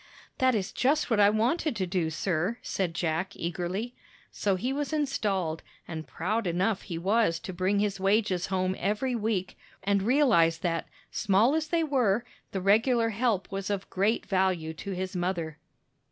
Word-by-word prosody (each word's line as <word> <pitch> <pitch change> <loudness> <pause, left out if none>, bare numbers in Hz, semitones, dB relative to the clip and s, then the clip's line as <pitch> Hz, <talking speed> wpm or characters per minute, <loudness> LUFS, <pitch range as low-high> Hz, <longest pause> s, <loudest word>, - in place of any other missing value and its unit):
"That 260 -2 +4
is 195 -2 -1
just 285 +1 +1
what 220 - +3
I 205 0 +7
wanted 240 +7 +1
to 190 -3 -1
do, 175 -2 0
sir," 175 +6 -1
said 180 -4 -2
Jack, 170 +4 -1
eagerly. 180 +7 -3 0.4
So 200 -2 0
he 250 +8 -2
was 290 +1 -2
installed, 195 - -1 0.3
and 160 -2 -6
proud 205 +5 -1
enough 185 +4 +1
he 170 - -5
was 195 0 +2
to 185 - -6
bring 185 +3 +1
his 200 -1 0
wages 195 -2 +1
home 185 -1 0
every 210 +7 0
week, 215 -5 -2 0.2
and 200 0 +2
realize 205 - +4
that, 165 -1 -1 0.2
small 210 +6 +3
as 315 0 0
they 330 +1 +1
were, 240 -7 +1 0.3
the 190 - -2
regular 225 +4 +3
help 220 -3 0
was 195 0 -3
of 200 -1 -2
great 205 +5 +1
value 185 -5 0
to 160 - -8
his 185 +1 -4
mother. 175 -4 -2
195 Hz, 170 wpm, -28 LUFS, 180-230 Hz, 0.4 s, I